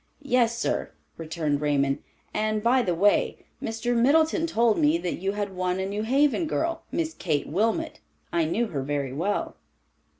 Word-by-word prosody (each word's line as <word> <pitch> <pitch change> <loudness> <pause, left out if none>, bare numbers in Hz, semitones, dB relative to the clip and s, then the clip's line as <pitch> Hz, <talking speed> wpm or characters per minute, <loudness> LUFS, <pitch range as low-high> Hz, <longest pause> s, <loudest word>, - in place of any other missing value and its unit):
"Yes, 240 -4 +2
sir," - - -1 0.3
returned 155 -3 -2
Raymond; 140 -2 +1 0.3
"and 215 0 0
by 250 +2 +4
the 180 -7 0
way, 205 +5 +3 0.2
Mr. 225 +2 -2
Middleton 315 +7 +3
told 235 -8 +2
me 150 +2 +4
that 175 +1 -3
you 195 +2 -1
had 205 -2 -3
won 180 0 -1
a 190 - -1
New 200 +2 -3
Haven 280 +7 +2
girl—Miss 325 0 -2
Kate 155 - -1
Wilmot. 230 - -1 0.3
I 170 -2 +2
knew 220 +9 0
her 140 -5 -3
very 140 -1 -2
well." 185 +9 -2
205 Hz, 160 wpm, -26 LUFS, 165-245 Hz, 0.3 s, by